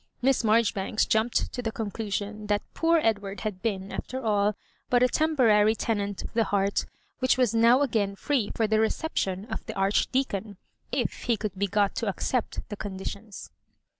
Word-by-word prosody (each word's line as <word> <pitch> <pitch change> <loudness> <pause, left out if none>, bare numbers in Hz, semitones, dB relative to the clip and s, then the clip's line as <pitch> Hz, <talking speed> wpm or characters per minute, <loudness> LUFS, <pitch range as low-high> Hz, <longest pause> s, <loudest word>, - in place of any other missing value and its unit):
Miss 260 0 +2
Marjoribanks 215 -2 +2
jumped 220 +2 +1
to 245 - -3
the 225 -2 -2
con 215 -2 -4
clusion 210 0 -4
that 205 0 +1
"poor 330 0 +3
Edward" 200 -3 -1
had 210 -4 -4
been, 200 -4 -2
after 260 - -4
all, 210 -3 +1 0.3
but 245 0 +4
a - - +6
temporary 235 -8 +3
tenant 205 -3 -2
of - - -8
the 230 -1 +2
heart, 200 0 0 0.3
which 255 -1 +3
was 250 -4 +2
now 235 +4 +5
again 210 -7 0
free 245 -1 0
for 225 - +2
the 215 0 +2
reception 210 -5 -1
of 220 -1 -5
the - - -4
Archdea 210 +7 +1
con, 200 0 -5 0.3
if - - -2
he 235 -2 +2
could 210 -2 -3
be 200 +2 0
got 200 +1 +1
to 230 - -1
accept 230 +4 -2
the 210 - -4
conditions. 200 +1 -7
215 Hz, 180 wpm, -27 LUFS, 200-235 Hz, 0.3 s, a